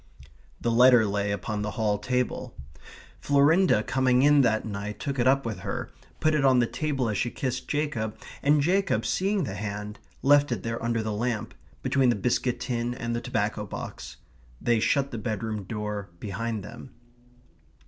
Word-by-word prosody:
The 120 - 0
letter 120 -1 +6
lay 100 0 -1
upon 105 +2 -3
the 105 - -2
hall 105 -2 +1
table; 125 +1 -2 0.6
Florinda 145 - +4
coming 130 +1 +2
in 145 0 +6
that 110 -4 +1
night 105 0 -5
took 140 -2 -3
it 120 - +3
up 135 0 +3
with 110 -3 -3
her, - - -4 0.3
put 155 - +2
it 150 -2 +2
on 130 -2 +5
the 120 - +4
table 135 -1 -2
as 105 -2 -1
she 120 - 0
kissed 130 0 -3
Jacob, 135 -8 -2 0.2
and 145 +1 +4
Jacob 195 +4 +1
seeing 195 0 +1
the 110 - -4
hand, 105 +1 -5 0.2
left 145 0 +5
it 105 -6 -2
there 115 0 -3
under 115 -1 0
the 110 -1 -2
lamp, 110 0 -2 0.3
between 135 -2 +3
the 120 - +3
biscuit 125 +3 0
tin 120 -1 -2
and 120 -1 -3
the 120 - -2
tobacco - - -1
box. - - -7 0.4
They 120 -2 +2
shut 140 +4 +1
the 115 - -4
bedroom 110 -2 -3
door 105 -1 -4
behind 110 +2 -3
them. 130 - -11
120 Hz, 175 wpm, -27 LUFS, 105-135 Hz, 0.6 s, letter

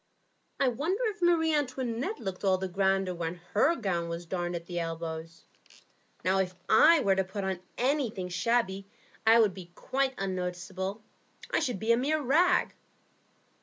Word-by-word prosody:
I 275 - +3
wonder 315 - -1
if 415 -2 -16
Marie 330 -2 +3
Antoinette 260 - -2
looked 190 -2 -5
all 190 -1 +3
the 190 +1 -3
grander 190 0 +1
when 170 0 -3 0.2
her 275 +11 +4
gown 175 - -2
was 170 +1 -5
darned 175 0 -3
at 170 0 -5
the 175 0 -4
elbows. 165 0 -5 0.8
Now, 190 +1 +3
if 185 -1 -1
I 320 +9 +6
were 195 -5 +3
to 190 - +2
put 190 -1 -4 0.2
anything 245 -8 0
shabby 195 +1 0 0.4
on, 225 - +8
I - - +6
should 205 -4 +1
be 180 -2 -11
quite 270 0 -1
unnoticeable. 190 +2 -4 0.5
I - - +2
should 245 -5 -1
be 220 +4 0
a 230 - +5
mere 295 +5 +1
rag." 310 +7 +3
195 Hz, 165 wpm, -29 LUFS, 180-260 Hz, 0.8 s, on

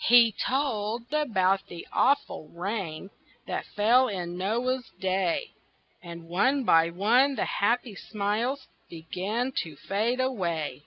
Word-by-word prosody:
He 235 -1 +7
told 235 -1 -2
about 195 -10 +1
the 175 - -9
awful 280 - +1
rain 185 0 -5 0.3
That - - -4
fell 240 +5 +4
in 175 -5 -4
Noah's 240 +7 -1
day, 190 - 0 0.5
And 170 -2 -10
one 255 +11 +2
by 165 -6 +4
one 235 +10 +3
the - - -1
happy 235 +2 0
smiles 215 +7 -2 0.2
Began 185 +9 -3
to 160 -3 -3
fade 215 - -1
away. 175 - -1
210 Hz, 120 wpm, -27 LUFS, 180-250 Hz, 0.5 s, He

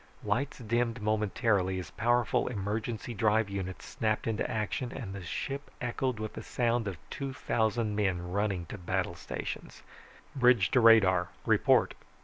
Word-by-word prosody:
Lights 120 +7 -1
dimmed 120 0 0
momentarily 105 -2 +1
as 90 - -6
powerful 120 +1 +1
emergency 110 +1 -3
drive 110 0 +2
units 95 -2 -5
snapped 110 -1 -1
into 115 -1 -1
action, 110 +3 -2
and 110 -8 -6
the 100 - -6
ship 140 +11 -4
echoed 125 0 -1
with 110 0 -4
the - - -6
sound 120 -1 0
of 95 -4 -4
two 135 -1 -4
thousand 110 -3 0
men 90 -4 0
running 100 -3 0
to 100 - -8
battle 90 0 -1
stations. 85 - -6 0.5
"Bridge 125 -6 +4
to - - +5
radar! 95 -6 +6 0.2
Report." - - +4
110 Hz, 145 wpm, -30 LUFS, 95-120 Hz, 0.5 s, radar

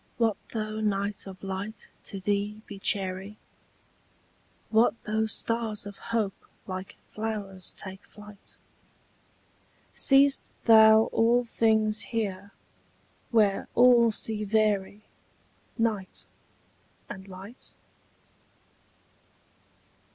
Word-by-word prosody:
What 225 -3 +2 0.2
though 215 -1 -3
night 200 -1 -1
of 190 -1 -11
light 195 +2 -5 0.2
to 195 - -5
thee 205 +2 -2
be 200 -2 -10
chary? 195 +1 0 1.3
What 225 +2 +4
though 220 0 0
stars 220 -1 -3
of 200 -1 -8
hope 220 -4 0 0.3
like 185 0 -7
flowers 205 -4 -4
take 190 0 -7
flight? 210 -1 -15 1.4
Seest 275 0 +4
thou 220 -1 +7
all 235 +2 +3
things 220 -2 +2
here, 200 -4 -3 0.8
where 210 -4 +2
all 240 -1 +6
see 215 0 0
vary 210 -1 0 0.7
Night 220 -5 -2 0.8
and 190 -1 -9
light? 195 +6 -12
210 Hz, 90 wpm, -27 LUFS, 195-225 Hz, 1.4 s, thou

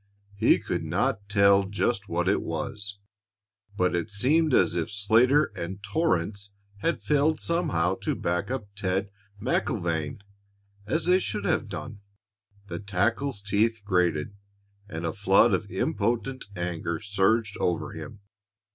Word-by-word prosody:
He 100 - +4
could - - -3
not 100 +1 -1
tell 100 -1 +5
just 100 0 -1
what 85 +2 0
it 100 - +2
was, 100 +5 -4 0.8
but 90 -2 +2
it 85 +5 -2
seemed 145 +10 +2
as 125 - +4
if 85 -2 -1
Slater 115 +8 +3
and 95 +4 -6
Torrance 100 - -1 0.2
had 165 +12 -1
failed 150 +1 +2
somehow 145 - 0
to - - -1
back 90 +4 -1
up 130 -5 -3
Ted 95 0 -1 0.3
MacIlvaine 85 - -1 0.7
as 160 +8 0
they 180 +1 +5
should 105 - -3
have 115 - +1
done. 105 +3 -7 0.6
The - - -5
tackle's 100 +5 -1
teeth 110 +2 +1
grated, 90 -2 +1 0.5
and 80 -1 -4
a 80 - -1
flood 100 +2 +4
of 100 +2 -1
impotent 130 - -1
anger 85 -2 -3
surged 105 +1 +1
over 85 -1 -1
him. 100 - -9
100 Hz, 135 wpm, -27 LUFS, 90-115 Hz, 0.8 s, tell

